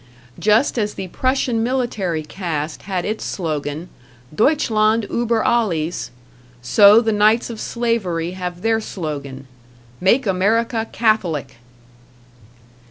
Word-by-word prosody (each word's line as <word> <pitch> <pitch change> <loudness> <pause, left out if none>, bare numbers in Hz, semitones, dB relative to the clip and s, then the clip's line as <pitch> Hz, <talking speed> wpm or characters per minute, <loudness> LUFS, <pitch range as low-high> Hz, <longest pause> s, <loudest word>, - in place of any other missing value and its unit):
Just 225 +5 +2
as 210 -1 -2
the 190 - -6
Prussian 255 0 0
military 225 -10 -1
caste 155 -2 -4
had 185 -2 -1
its 215 +1 -3
slogan 155 -2 -4 0.5
"Deutschland 220 - +2
ueber 235 -2 0
Alles!" 170 - 0 0.5
so 200 - +6
the 225 -1 0
Knights 215 +3 +3
of 225 - -8
Slavery 200 -8 -1
have 180 -1 -6
their 225 0 +2
slogan: 140 -9 -6 0.5
"Make 230 +8 +3
America 225 +4 +1
Catholic!" 170 - 0
210 Hz, 105 wpm, -20 LUFS, 165-230 Hz, 0.5 s, so